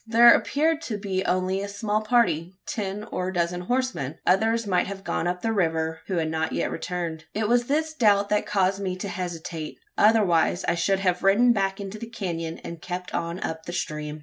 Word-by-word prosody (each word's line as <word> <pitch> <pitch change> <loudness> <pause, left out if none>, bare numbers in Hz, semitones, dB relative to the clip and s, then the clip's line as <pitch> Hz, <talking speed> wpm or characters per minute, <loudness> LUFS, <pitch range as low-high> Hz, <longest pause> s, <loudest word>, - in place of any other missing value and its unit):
There 235 +1 +8
appeared 315 +2 +1
to 215 - -2
be 195 -2 -2
only 185 +1 0
a 200 - -3
small 210 +1 -1
party 190 -7 +1
ten 205 -1 -3
or 180 - -2
a 185 - -3
dozen 175 +1 0
horsemen. 245 - -1
Others 225 +5 +2
might 185 -3 +1
have 195 0 -7
gone 175 - -1
up 180 0 -2
the 225 -1 +1
river, 160 -4 0
who 190 - -2
had 160 -1 0
not 160 0 -1
yet - - -1
returned. 165 -2 -4
It 215 0 0
was 240 +1 +3
this 315 +2 0
doubt 205 -7 +3
that 210 0 +1
caused 195 -1 +1
me 185 -2 -2
to 185 +2 -5
hesitate; 170 -4 -5 0.2
otherwise 195 -5 +4
I - - +3
should 190 +3 +1
have 180 -2 +1
ridden 230 +5 +5
back 195 -2 -1
into 200 +1 -6
the 230 - -6
canon, 170 -7 -4
and 170 -1 -7
kept 180 0 -5
on 170 +2 -3
up 160 0 -5
the 175 - -5
stream. 150 -2 -4
190 Hz, 205 wpm, -25 LUFS, 170-215 Hz, 0.2 s, There